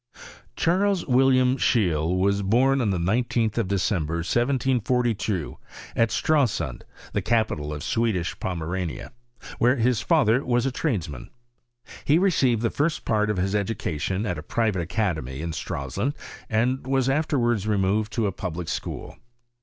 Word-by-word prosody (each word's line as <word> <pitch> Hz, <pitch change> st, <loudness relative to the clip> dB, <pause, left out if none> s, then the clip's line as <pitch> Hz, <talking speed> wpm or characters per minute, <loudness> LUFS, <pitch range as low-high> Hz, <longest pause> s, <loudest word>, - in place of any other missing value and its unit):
Charles 190 Hz, +2 st, +1 dB
William 130 Hz, 0 st, +3 dB
Scheeie 90 Hz, -, +1 dB
was 100 Hz, +2 st, +2 dB
born 130 Hz, +7 st, +3 dB
on 110 Hz, -, +1 dB
the 95 Hz, -, 0 dB
19ti 110 Hz, +4 st, 0 dB
of 110 Hz, -, 0 dB
December, 90 Hz, -4 st, 0 dB
1742, 120 Hz, -, 0 dB, 0.4 s
at 115 Hz, -1 st, +3 dB
StraUund, 140 Hz, 0 st, 0 dB, 0.3 s
the -, -, 0 dB
capital 110 Hz, -10 st, 0 dB
o( 75 Hz, -, -3 dB
Swedish 95 Hz, 0 st, -1 dB
Pomerania, 90 Hz, -3 st, -4 dB, 0.5 s
where 125 Hz, +3 st, +4 dB
his 120 Hz, -2 st, +1 dB
father 135 Hz, -6 st, +3 dB
was 120 Hz, 0 st, +1 dB
a 135 Hz, -, 0 dB
tradn 120 Hz, -, -1 dB
mHn. 70 Hz, -5 st, -8 dB, 0.8 s
He 150 Hz, -, +4 dB
received 135 Hz, -, +2 dB
the 115 Hz, -, +1 dB
first 155 Hz, +2 st, -1 dB
part 105 Hz, -1 st, +1 dB
of 105 Hz, -, 0 dB
his 95 Hz, +2 st, 0 dB
education 100 Hz, -2 st, -2 dB
at 90 Hz, -5 st, -2 dB
a -, -, -6 dB
private 110 Hz, -6 st, 0 dB
academy 80 Hz, -, -2 dB
in 85 Hz, +2 st, -3 dB
Stralsund, 80 Hz, -, -3 dB, 0.3 s
and 125 Hz, +4 st, 0 dB
was 135 Hz, -1 st, +1 dB
Os 145 Hz, +4 st, +2 dB
walds 120 Hz, -7 st, +1 dB
removed 105 Hz, +1 st, +1 dB
to 110 Hz, 0 st, 0 dB
a 100 Hz, -, +1 dB
public 90 Hz, -3 st, -5 dB
school. -, -, -5 dB
110 Hz, 145 wpm, -25 LUFS, 90-125 Hz, 0.8 s, where